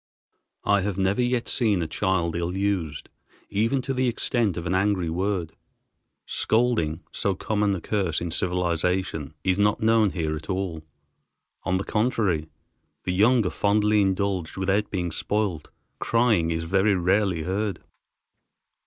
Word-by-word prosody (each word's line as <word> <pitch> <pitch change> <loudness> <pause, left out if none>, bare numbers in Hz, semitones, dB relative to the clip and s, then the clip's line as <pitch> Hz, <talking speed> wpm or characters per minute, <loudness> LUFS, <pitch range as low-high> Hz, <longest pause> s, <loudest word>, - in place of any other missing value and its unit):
I 100 -1 +3
have 100 -1 -2
never 95 +4 +1
yet 125 -1 0
seen 105 -8 +1
a - - -3
child 85 -1 0
ill 85 +2 -2
used, 95 -7 -1 0.4
even 115 +6 +1
to 135 - -2
the 130 0 +1
extent 115 -4 0
of 85 - -4
an 85 - -1
angry 95 -3 +1
word. 90 -1 -1 0.7
Scolding, 110 -9 +1
so 100 -2 -1
common 105 0 0
a 90 - -5
curse 95 -6 0
in 85 -1 -4
civilization, 90 -3 -1
is 95 +1 +1
not 105 0 +3
known 110 -1 +4
here 80 -4 -2
at 80 +4 -9
all. 95 -4 -2 0.8
On 95 - +1
the 95 - -2
contrary 105 -9 0 0.5
the 90 - -1
young 110 +4 +4
are 90 - 0
fondly 105 +1 +2
indulged 95 -3 -1
without 100 +2 +1
being 90 -3 -2
spoiled. 100 -3 -2 0.3
Crying 115 -8 +2
is 80 0 -1
very 95 +4 +2
rarely 90 -1 +1
heard. 100 +3 -2
95 Hz, 145 wpm, -25 LUFS, 85-105 Hz, 0.8 s, known